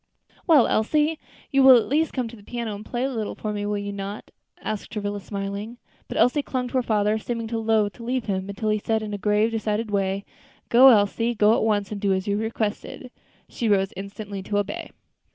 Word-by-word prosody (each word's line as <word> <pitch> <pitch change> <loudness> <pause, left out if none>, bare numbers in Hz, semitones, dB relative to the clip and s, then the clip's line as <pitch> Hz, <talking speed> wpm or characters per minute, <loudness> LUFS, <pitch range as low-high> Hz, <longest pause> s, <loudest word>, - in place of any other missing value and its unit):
"Well, 300 -8 +6
Elsie, 300 +8 +1 0.3
you 275 - +4
will 265 -1 +9
at 230 - +1
least 310 +3 +1
come 255 -3 -2
to 230 - -10
the 210 - -15
piano 235 0 -4
and 205 +1 -7
play 240 +2 -3
a 270 - 0
little 225 -5 -3
for 215 -1 -4
me, 205 0 -3
will 205 0 -1
you 205 0 -4
not?" 200 +1 -6 0.3
asked 215 -2 -5
Travilla, 205 -2 -3
smiling. 200 +4 -5 0.3
But - - -5
Elsie 270 +4 +3
still - - -22
clung 250 -2 -1
to 260 - -1
her - - +3
father, 215 -2 +1
seeming 230 +1 -4
loath 220 -2 +1
to 235 - -12
leave 250 0 -2
him, 190 -1 -2
until 205 +2 -2
he 215 0 +1
said, 220 +1 -1
in 210 - -5
his 205 -1 -5
grave, 210 +2 +2
decided 220 0 -2
way, 195 0 -1 0.4
"Go, 255 +3 +8
Elsie; 230 +1 +3
go 210 +1 +4
at - - 0
once, 205 -2 0
and 205 -1 -5
do 200 -2 +2
as 190 +1 -2
you 200 - +1
are - - -2
requested." 220 -1 -3
Then 250 - -11 0.4
she 230 - -2
rose 195 -1 +2
instantly 200 0 -7
to 205 +2 -2
obey. 205 0 -3
215 Hz, 230 wpm, -24 LUFS, 205-235 Hz, 0.4 s, will